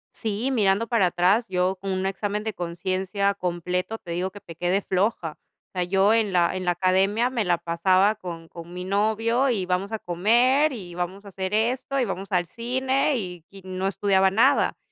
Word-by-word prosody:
Sí, 225 Hz, +4 st, -2 dB
mirando 205 Hz, -2 st, +2 dB
para 225 Hz, -6 st, +2 dB
atrás, 185 Hz, +7 st, +2 dB
yo 185 Hz, +1 st, +1 dB
con 195 Hz, -1 st, -3 dB
un 185 Hz, 0 st, -1 dB
examen 205 Hz, +2 st, -2 dB
de 220 Hz, -2 st, -3 dB
conciencia 185 Hz, +3 st, -1 dB
completo, 180 Hz, +3 st, -3 dB
te 170 Hz, -, -10 dB
digo 180 Hz, +2 st, -1 dB
que 205 Hz, +2 st, -12 dB
te 170 Hz, -, -10 dB
quedé 180 Hz, +3 st, 0 dB
floja. 185 Hz, -3 st, 0 dB, 0.4 s
O -, -, -76 dB
sea, 180 Hz, -1 st, 0 dB
yo 195 Hz, +3 st, +3 dB
en 220 Hz, -3 st, +2 dB
la 175 Hz, 0 st, +2 dB
en 185 Hz, -1 st, -4 dB
la 175 Hz, -, +3 dB
academia 195 Hz, +7 st, +2 dB
me 235 Hz, -4 st, 0 dB
la 175 Hz, -2 st, +2 dB
pasaba 185 Hz, +4 st, +2 dB
con 170 Hz, -5 st, -8 dB
con 170 Hz, +1 st, -11 dB
mi 180 Hz, 0 st, -5 dB
novio, 220 Hz, +6 st, +1 dB
y 200 Hz, -6 st, 0 dB
vamos 185 Hz, +3 st, -1 dB
a 220 Hz, -, -1 dB
comer, 240 Hz, -, +3 dB
y 185 Hz, -8 st, -8 dB
vamos 185 Hz, +3 st, -4 dB
a -, -, -9 dB
hacer 190 Hz, +2 st, -3 dB
esto, 255 Hz, +4 st, 0 dB
y 250 Hz, -, +2 dB
vamos 195 Hz, 0 st, -5 dB
al 175 Hz, -1 st, +2 dB
cine 260 Hz, -, 0 dB
y 180 Hz, -5 st, -6 dB
y 195 Hz, -1 st, -14 dB
no 185 Hz, +1 st, -2 dB
estudiaba 195 Hz, 0 st, +2 dB
nada. 245 Hz, +8 st, +3 dB
195 Hz, 200 wpm, -25 LUFS, 180-220 Hz, 0.4 s, yo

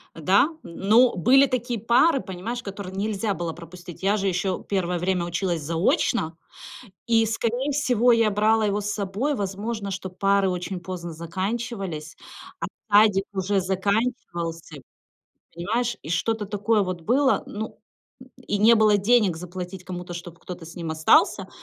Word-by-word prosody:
Да, 190 Hz, -, +3 dB
но 220 Hz, +8 st, +3 dB
были 255 Hz, +10 st, +5 dB
такие 245 Hz, -3 st, -2 dB
пары, 250 Hz, +8 st, +4 dB
понимаешь, 220 Hz, +6 st, -5 dB
которые 195 Hz, -1 st, -7 dB
нельзя 205 Hz, +1 st, -1 dB
было 170 Hz, -1 st, -3 dB
пропустить. 175 Hz, +1 st, -11 dB
Я 200 Hz, +2 st, +3 dB
же 200 Hz, -1 st, -1 dB
ещё 185 Hz, 0 st, 0 dB
первое 180 Hz, -3 st, -1 dB
время 180 Hz, 0 st, 0 dB
училась 175 Hz, -1 st, -2 dB
заочно, 165 Hz, 0 st, 0 dB, 0.7 s
и 225 Hz, -1 st, +4 dB
скорее 235 Hz, +5 st, -1 dB
всего, 250 Hz, -4 st, +3 dB
я 230 Hz, -2 st, +3 dB
брала 215 Hz, +2 st, +2 dB
его 205 Hz, 0 st, 0 dB
с 205 Hz, 0 st, -3 dB
собой. 205 Hz, +8 st, -1 dB
Возможно, 200 Hz, 0 st, -3 dB
что 190 Hz, 0 st, -5 dB
пары 195 Hz, +1 st, +2 dB
очень 180 Hz, +1 st, -4 dB
поздно 175 Hz, -1 st, -6 dB
заканчивались, 185 Hz, -1 st, -4 dB, 0.4 s
а -, -, -2 dB, 0.3 s
садик 205 Hz, -2 st, +5 dB
уже 195 Hz, 0 st, 0 dB
заканчивался, 190 Hz, -4 st, -2 dB, 0.8 s
понимаешь, 220 Hz, +7 st, -1 dB
и 150 Hz, -, -8 dB
что-то 215 Hz, +6 st, 0 dB
такое 210 Hz, +2 st, +1 dB
вот 185 Hz, -2 st, -4 dB
было. 265 Hz, -, +2 dB
Ну, 220 Hz, +2 st, -6 dB, 0.4 s
м, 255 Hz, -, -14 dB, 0.2 s
и 205 Hz, -, 0 dB
не 220 Hz, +3 st, +6 dB
было 215 Hz, -2 st, +4 dB
денег 205 Hz, -4 st, +3 dB
заплатить 180 Hz, +2 st, -7 dB
кому-то, 180 Hz, -1 st, -6 dB
чтоб 170 Hz, -1 st, -8 dB
кто-то 175 Hz, -1 st, -9 dB
с 165 Hz, -, -11 dB
ним 165 Hz, -2 st, -5 dB
остался, 160 Hz, 0 st, +3 dB
195 Hz, 150 wpm, -24 LUFS, 175-225 Hz, 0.8 s, не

